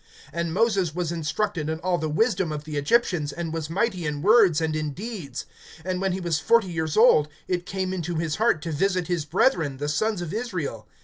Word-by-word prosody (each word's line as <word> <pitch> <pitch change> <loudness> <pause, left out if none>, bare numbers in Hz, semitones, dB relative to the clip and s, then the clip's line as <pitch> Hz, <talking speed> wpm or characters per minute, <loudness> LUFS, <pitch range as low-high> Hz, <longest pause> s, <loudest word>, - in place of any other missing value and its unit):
(22)And 170 +1 -1
Moses 190 -3 +1
was 175 -2 -1
instructed 165 +1 -2
in 160 - -1
all 180 -1 0
the 155 - -2
wisdom 180 0 +1
of 150 -1 -4
the 155 -1 -6
Egyptians, 150 -1 +1
and 165 0 -4
was 160 -2 -3
mighty 190 0 0
in 145 0 -3
words 205 -6 +5
and 160 -1 -1
in 155 -2 -2
deeds. 185 - -6 0.4
(23)And 185 0 -2
when 195 -1 +1
he 185 - -2
was 170 -4 0
forty 230 +3 +3
years 160 0 -2
old, 215 -10 +6 0.2
it 180 -1 -2
came 190 -1 -2
into 175 -2 -3
his 160 -1 -1
heart 220 -9 +2
to 165 - -3
visit 180 +3 +1
his 170 -3 -1
brethren 160 - +1
the 145 +2 -3
sons 185 +5 0
of 170 - -6
Israel. 180 - -4
170 Hz, 210 wpm, -25 LUFS, 155-195 Hz, 0.4 s, old